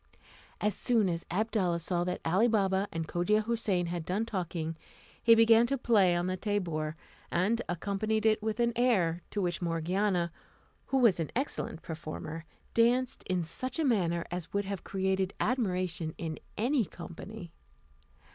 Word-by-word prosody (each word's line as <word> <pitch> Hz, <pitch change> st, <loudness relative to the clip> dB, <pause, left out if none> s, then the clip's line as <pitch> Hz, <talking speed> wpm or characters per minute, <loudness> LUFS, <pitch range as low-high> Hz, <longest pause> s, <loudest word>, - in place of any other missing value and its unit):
As 210 Hz, 0 st, +1 dB
soon 225 Hz, 0 st, +2 dB
as 170 Hz, -1 st, -3 dB
Abdalla 190 Hz, -2 st, +1 dB
saw 175 Hz, +1 st, 0 dB
that 180 Hz, -, -2 dB
Ali 190 Hz, +8 st, +4 dB
Baba 195 Hz, -3 st, +2 dB
and 165 Hz, -1 st, -3 dB
Cogia 210 Hz, +7 st, +2 dB
Houssain 215 Hz, -6 st, 0 dB
had 170 Hz, -1 st, -3 dB
done 195 Hz, +7 st, -1 dB
talking, 170 Hz, -6 st, -3 dB, 0.5 s
he 230 Hz, -1 st, +7 dB
began 230 Hz, +1 st, +6 dB
to 275 Hz, -, 0 dB
play 205 Hz, -8 st, +4 dB
on 175 Hz, 0 st, 0 dB
the 185 Hz, 0 st, -1 dB
tabour, 170 Hz, -7 st, -2 dB, 0.3 s
and 205 Hz, +7 st, +1 dB
accompanied 205 Hz, +5 st, -1 dB
it 215 Hz, 0 st, +4 dB
with 220 Hz, +1 st, -2 dB
an 235 Hz, 0 st, +2 dB
air, 190 Hz, -9 st, +2 dB
to 210 Hz, -, -3 dB
which 175 Hz, 0 st, -1 dB
Morgiana, 175 Hz, +2 st, 0 dB, 0.6 s
who 270 Hz, -, +1 dB
was 230 Hz, -9 st, +5 dB
an 160 Hz, -, -1 dB
excellent 245 Hz, -, -3 dB
performer, 160 Hz, 0 st, -6 dB, 0.3 s
danced 245 Hz, +2 st, +2 dB
in 185 Hz, -2 st, 0 dB
such 250 Hz, +10 st, -4 dB
a 320 Hz, -, +1 dB
manner 170 Hz, -9 st, +1 dB
as 175 Hz, -1 st, -4 dB
would 200 Hz, 0 st, 0 dB
have 195 Hz, -2 st, -4 dB
created 190 Hz, 0 st, -1 dB
admiration 180 Hz, -9 st, -1 dB
in 160 Hz, -2 st, -4 dB, 0.2 s
any 245 Hz, +3 st, +2 dB
company. 180 Hz, +1 st, -9 dB
190 Hz, 155 wpm, -31 LUFS, 170-220 Hz, 0.6 s, he